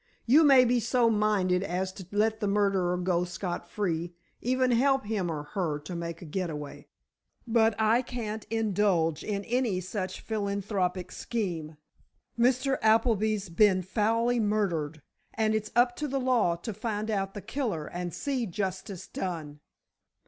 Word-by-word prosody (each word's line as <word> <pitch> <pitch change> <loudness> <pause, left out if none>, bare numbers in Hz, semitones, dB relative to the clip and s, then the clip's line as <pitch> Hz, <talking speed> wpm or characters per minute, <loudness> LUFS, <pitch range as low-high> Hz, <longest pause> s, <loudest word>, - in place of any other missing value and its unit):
You 285 +7 +6
may 270 -4 +7
be 245 0 +3
so 235 0 +2
minded 205 -4 +2
as 185 0 -2
to 190 -3 -10
let 220 +2 +1
the 210 - -1
murderer 195 -3 +2
go 180 -1 +1
scot 175 0 -5
free, 175 -4 -2 0.3
even 255 +1 +2
help 270 +1 +3
him 205 -5 -1
or 150 -2 -3
her 175 -7 -1
to 155 +4 -8
make 170 0 -5
a - - -8
getaway, 155 -3 -5 0.6
but 225 -2 +3
I 220 +3 +4
can't 225 -4 -5
indulge 205 -7 +1
in 200 -1 -2
any 235 -6 0
such 185 0 -4
philanthropic 200 -3 -2
scheme. 170 -10 -4 0.6
Mr. 255 +3 +2
Appleby's 220 -2 +2
been 185 +1 +4
foully 230 +5 +1
murdered, 175 -9 -1 0.3
and 220 -1 +1
it's 215 -1 -1
up 245 0 +4
to 300 - -2
the 275 0 -1
law 245 -9 +2
to 190 +6 -6
find 215 +1 -3
out 195 -2 -2
the - - -4
killer 210 - -2
and 175 0 -5
see 260 - -2
justice 190 0 -4
done. 155 -5 -5
205 Hz, 150 wpm, -28 LUFS, 180-230 Hz, 0.6 s, may